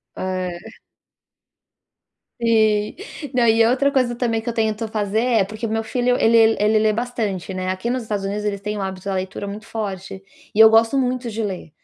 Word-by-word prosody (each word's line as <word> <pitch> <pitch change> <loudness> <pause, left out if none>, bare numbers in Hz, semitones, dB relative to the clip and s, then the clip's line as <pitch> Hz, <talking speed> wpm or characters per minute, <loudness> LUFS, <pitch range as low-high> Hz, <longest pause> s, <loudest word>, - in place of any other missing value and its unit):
É. 185 +2 -5 1.6
Sim, 220 -2 +2 0.4
não, 245 -1 +3
e 225 0 +5
outra 260 +4 +2
coisa 255 -3 +1
também 235 -2 0
que 225 - -17
eu 235 - -1
tento 220 0 -1
fazer 210 -1 -1
é, 230 -3 +2
porque 215 +4 -5
meu 225 +1 -1
filho 245 +2 0
ele 225 0 +5
ele 215 +1 +3
lê 215 0 +2
bastante, 220 -6 -3
né, 185 0 -4
aqui 185 +5 -2
nos 250 0 -1
Estados 210 -3 -3
Unidos 205 +2 -3
eles 200 -1 -2
têm 210 +1 -3
o - - -3
hábito 190 -1 -5
da - - -1
leitura 190 +1 -4
muito 205 +2 -7
forte, 195 -4 -6 0.3
e - - -5
eu 220 0 +10
gosto 225 +4 +4
muito 250 -2 -1
de 225 0 -3
ler, 190 -5 -5
220 Hz, 195 wpm, -21 LUFS, 200-230 Hz, 1.6 s, eu